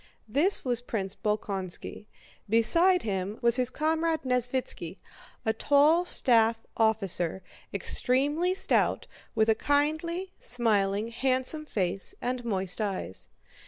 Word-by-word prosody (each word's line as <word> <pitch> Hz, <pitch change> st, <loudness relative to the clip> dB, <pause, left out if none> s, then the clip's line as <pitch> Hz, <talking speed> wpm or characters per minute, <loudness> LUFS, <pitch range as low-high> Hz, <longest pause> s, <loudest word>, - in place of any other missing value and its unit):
This 295 Hz, -, +1 dB
was 245 Hz, -1 st, +1 dB
Prince 200 Hz, -5 st, -3 dB
Bolkónski. 210 Hz, -2 st, -4 dB, 0.4 s
Beside 335 Hz, -, +4 dB
him 195 Hz, 0 st, -3 dB
was 235 Hz, +1 st, +3 dB
his 250 Hz, -1 st, +2 dB
comrade 320 Hz, +2 st, -1 dB
Nesvítski, 250 Hz, 0 st, -2 dB, 0.5 s
a 220 Hz, -, +2 dB
tall 295 Hz, +8 st, +3 dB
staff 230 Hz, -8 st, +4 dB, 0.2 s
officer, 195 Hz, -5 st, 0 dB, 0.3 s
extremely 290 Hz, +8 st, +1 dB
stout, -, -, +1 dB, 0.3 s
with 220 Hz, -1 st, +3 dB
a 225 Hz, -, +5 dB
kindly, 315 Hz, +8 st, -1 dB
smiling, 215 Hz, -3 st, 0 dB
handsome 260 Hz, +5 st, -1 dB
face 190 Hz, -4 st, -2 dB
and 250 Hz, 0 st, -3 dB
moist 190 Hz, -3 st, -2 dB
eyes. 190 Hz, -, -4 dB
240 Hz, 110 wpm, -28 LUFS, 210-290 Hz, 0.5 s, a